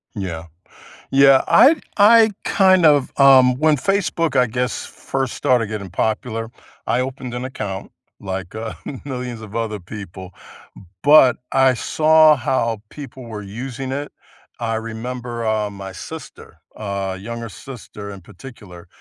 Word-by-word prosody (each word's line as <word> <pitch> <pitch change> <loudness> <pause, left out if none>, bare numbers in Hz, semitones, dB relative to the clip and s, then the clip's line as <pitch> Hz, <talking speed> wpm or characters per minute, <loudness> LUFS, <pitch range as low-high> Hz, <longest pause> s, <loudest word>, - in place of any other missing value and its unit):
Yeah. 85 -5 -5 0.7
Yeah, 135 0 +6
I 290 +6 +6 0.2
I 220 +2 +7
kind 185 -3 +4
of 145 -3 +3
um, 130 -2 +6
when 155 0 +3
Facebook, 165 -3 -1
I 125 - +4
guess, 125 +2 -3
first 135 -2 -4
started 125 -3 +1
getting 100 -3 -6
popular, 110 +3 -2 0.4
I 120 - +1
opened 130 -1 -5
an 125 +1 -4
account, 100 -7 -6 0.3
like, 95 -2 -6
uh, 110 +1 -5 0.3
millions 125 -4 -6
of 110 -1 -11
other 110 -3 -3
people, 95 -1 -9 0.7
but 145 -3 +6
I 130 -1 +4
saw 155 +3 +4
how 115 -4 -1
people 135 -3 -10
were 110 -3 -8
using 130 +6 -6
it. 145 +2 -4 0.5
I 115 -1 -2
remember, 115 +1 -5
um, 105 -2 -1
my 95 -1 -8
sister- 90 - -10 0.2
uh, 100 -2 -4
younger 115 +2 -6
sister 105 -1 -10
in 100 -1 -9
particular- 90 -3 -13
120 Hz, 135 wpm, -20 LUFS, 105-135 Hz, 0.7 s, I